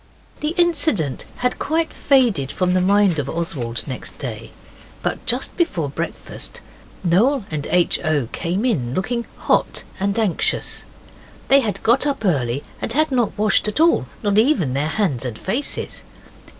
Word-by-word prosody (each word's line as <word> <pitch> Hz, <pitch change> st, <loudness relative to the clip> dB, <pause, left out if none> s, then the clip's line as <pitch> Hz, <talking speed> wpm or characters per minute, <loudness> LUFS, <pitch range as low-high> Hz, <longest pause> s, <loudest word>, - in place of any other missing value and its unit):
The 305 Hz, +3 st, -2 dB
incident 315 Hz, -, +1 dB, 0.2 s
had 250 Hz, -, +1 dB
quite 320 Hz, +1 st, 0 dB
faded 230 Hz, -, +2 dB
from 180 Hz, -1 st, 0 dB
the 185 Hz, -, +3 dB
mind 195 Hz, -3 st, +3 dB
of 135 Hz, -2 st, -2 dB
Oswald 130 Hz, -10 st, -2 dB
next 130 Hz, -3 st, -6 dB
day. -, -, -6 dB, 0.5 s
But -, -, -2 dB
just -, -, +1 dB
before 175 Hz, -, 0 dB
breakfast 135 Hz, -, -6 dB, 0.4 s
Noel 215 Hz, +8 st, +3 dB
and 150 Hz, -2 st, -2 dB
H. 180 Hz, -1 st, +3 dB
O. 150 Hz, -6 st, +1 dB
came 185 Hz, +7 st, -2 dB
in, 135 Hz, -, 0 dB
looking 235 Hz, +5 st, -2 dB
hot -, -, +1 dB, 0.2 s
and 200 Hz, +2 st, 0 dB
anxious. 215 Hz, -7 st, 0 dB, 0.6 s
They 275 Hz, -, +7 dB
had 220 Hz, -6 st, -2 dB
got 250 Hz, +6 st, +4 dB
up 275 Hz, -6 st, -2 dB
early 135 Hz, -6 st, +1 dB, 0.2 s
and -, -, -2 dB
had 310 Hz, +2 st, +2 dB
not 245 Hz, -4 st, 0 dB
washed 215 Hz, 0 st, +3 dB
at 210 Hz, -, -1 dB
all 325 Hz, -, +4 dB, 0.2 s
not 205 Hz, 0 st, +3 dB
even 215 Hz, -, +2 dB
their 140 Hz, +3 st, 0 dB
hands 155 Hz, -, 0 dB
and 120 Hz, -4 st, -4 dB
faces. 245 Hz, +10 st, -3 dB
195 Hz, 155 wpm, -21 LUFS, 150-250 Hz, 0.6 s, They